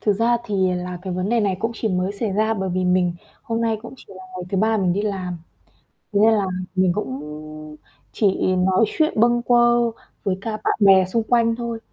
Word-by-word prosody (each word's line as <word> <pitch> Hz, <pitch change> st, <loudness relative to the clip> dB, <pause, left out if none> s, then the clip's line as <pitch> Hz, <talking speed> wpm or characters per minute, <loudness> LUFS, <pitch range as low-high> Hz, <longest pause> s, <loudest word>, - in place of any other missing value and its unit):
Thực 210 Hz, -, +2 dB
ra 230 Hz, +4 st, +2 dB
thì 190 Hz, -4 st, 0 dB
là 180 Hz, 0 st, -5 dB
cái 190 Hz, -1 st, -4 dB
vấn 185 Hz, +2 st, -2 dB
đề 235 Hz, +1 st, +2 dB
này 195 Hz, -3 st, 0 dB
cũng 225 Hz, +1 st, -1 dB
chỉ 225 Hz, -, -2 dB
mới 185 Hz, 0 st, -1 dB
xảy 205 Hz, 0 st, -3 dB
ra 220 Hz, +2 st, +1 dB
bởi 190 Hz, -2 st, -3 dB
vì 185 Hz, 0 st, -1 dB
mình 180 Hz, -1 st, +2 dB, 0.3 s
hôm 230 Hz, -3 st, -2 dB
nay 225 Hz, -1 st, +1 dB
cũng 240 Hz, -, -9 dB
chỉ -, -, -16 dB
là 185 Hz, -, -11 dB
ngày 180 Hz, -1 st, -5 dB
thứ 195 Hz, -, -1 dB
3 220 Hz, +2 st, +2 dB
mình 185 Hz, -3 st, +1 dB
đi 200 Hz, +3 st, -1 dB
làm, 185 Hz, -4 st, -3 dB, 0.8 s
thế 200 Hz, -, +2 dB
nên 220 Hz, +2 st, +5 dB
là 205 Hz, -3 st, +1 dB, 0.3 s
mình 185 Hz, -1 st, +3 dB
cũng 135 Hz, -9 st, -4 dB, 0.9 s
chỉ 200 Hz, -4 st, +1 dB
nói 185 Hz, +4 st, +3 dB
chuyện 310 Hz, -1 st, 0 dB
bâng 240 Hz, +1 st, +3 dB
quơ 240 Hz, -1 st, +3 dB, 0.3 s
với 190 Hz, -2 st, -1 dB
cả 225 Hz, -, -4 dB
bạn -, -, +1 dB
bè 190 Hz, -1 st, +6 dB
xung 225 Hz, +5 st, -1 dB
quanh 230 Hz, 0 st, +2 dB
thôi. 235 Hz, -1 st, -4 dB
205 Hz, 220 wpm, -21 LUFS, 185-230 Hz, 0.9 s, bè